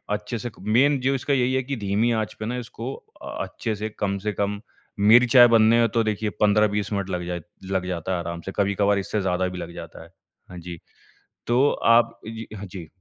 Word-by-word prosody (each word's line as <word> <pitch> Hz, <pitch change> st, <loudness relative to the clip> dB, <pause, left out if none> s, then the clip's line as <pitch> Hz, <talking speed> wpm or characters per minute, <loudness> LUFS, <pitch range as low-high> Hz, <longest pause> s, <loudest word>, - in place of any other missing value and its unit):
अच्छे 105 Hz, +3 st, -5 dB
से 120 Hz, -, -4 dB
क -, -, -15 dB
मेन 135 Hz, +5 st, +4 dB
जो 135 Hz, +2 st, +1 dB
इसका 135 Hz, +2 st, -1 dB
यही 130 Hz, -1 st, +2 dB
है 130 Hz, -, +2 dB
कि 140 Hz, +2 st, -4 dB
धीमी 105 Hz, +3 st, +1 dB
आँच 110 Hz, -2 st, -1 dB
पे 110 Hz, -, -4 dB
ना 120 Hz, +3 st, -3 dB
इसको 125 Hz, +2 st, -6 dB, 0.3 s
अ, -, -, -9 dB, 0.2 s
अच्छे 110 Hz, -, -4 dB
से 105 Hz, +1 st, -4 dB
कम 100 Hz, -1 st, 0 dB
से 105 Hz, -, +2 dB
कम 100 Hz, 0 st, -2 dB, 0.4 s
मेरी 110 Hz, +5 st, +7 dB
चाय 120 Hz, 0 st, +8 dB
बनने 115 Hz, 0 st, +5 dB
में 115 Hz, -, +4 dB
तो 115 Hz, -, +2 dB
देखिए 110 Hz, 0 st, -1 dB
15-20 105 Hz, 0 st, +2 dB
मिनट 100 Hz, -1 st, -2 dB
लग 90 Hz, -2 st, -3 dB
जाए 90 Hz, -1 st, -3 dB, 0.3 s
लग 95 Hz, -1 st, 0 dB
जाता 90 Hz, 0 st, -3 dB
है 90 Hz, -, -1 dB
आराम 85 Hz, 0 st, -5 dB
से, 95 Hz, -, -6 dB
कभी-कभार 100 Hz, 0 st, +2 dB
इससे 105 Hz, +2 st, -2 dB
ज़्यादा 95 Hz, -1 st, 0 dB
भी 90 Hz, 0 st, -6 dB
लग 85 Hz, -1 st, -7 dB
जाता -, -, -9 dB
है। -, -, -16 dB, 0.4 s
हाँ 90 Hz, -, -10 dB
जी, 85 Hz, -1 st, -8 dB, 0.7 s
तो 130 Hz, +4 st, +3 dB
आप 115 Hz, 0 st, +3 dB
जी, 115 Hz, 0 st, -7 dB
हाँ 105 Hz, -, -7 dB
जी। 90 Hz, -4 st, -9 dB
105 Hz, 225 wpm, -24 LUFS, 95-120 Hz, 0.7 s, चाय